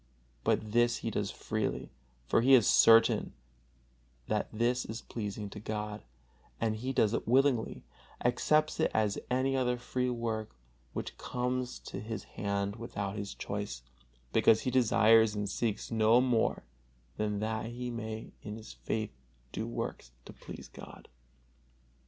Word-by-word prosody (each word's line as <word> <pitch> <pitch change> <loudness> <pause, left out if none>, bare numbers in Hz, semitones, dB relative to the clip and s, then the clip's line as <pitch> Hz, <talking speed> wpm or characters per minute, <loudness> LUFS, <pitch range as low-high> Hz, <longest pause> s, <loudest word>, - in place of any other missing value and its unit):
But 105 -1 +1
this 120 +1 +3
he - - 0
does - - -1
freely, - - -3 0.3
for 90 - +3
he 130 +3 +7
is 120 -5 +5
certain 115 0 +6 0.9
that - - 0
this 120 +3 +1
is 110 +2 -6
pleasing 105 -2 -5
to 105 - -7
God, 105 0 -4 0.6
and 110 -1 0
he 125 +5 -3
does 110 -4 +2
it - - -2
willingly, 130 -1 +2 0.4
accepts 155 +5 +2
it - - +3
as 105 -2 +1
any 130 +2 +1
other 125 -2 +1
free 125 +1 -1
work 115 - -3 0.4
which - - -5
comes 125 0 -2
to - - -7
his 110 0 -5
hand 100 +1 -3
without 100 -3 -4
his 100 -1 -5
choice, 100 -12 -4 0.5
because 110 - +5
he 130 - -1
desires 115 -3 +5
and 105 0 -2
seeks 110 +2 -2
no 110 +1 +5
more 125 -3 +1 0.5
than 105 -1 -1
that 110 +1 -2
he 120 +1 -5
may 110 -1 -5
in 105 0 -6
his 110 0 -10
faith 110 -1 -3 0.4
do 110 - -3
works - - -5
to - - -10
please - - -10
God. - - -12
110 Hz, 145 wpm, -31 LUFS, 105-125 Hz, 0.9 s, he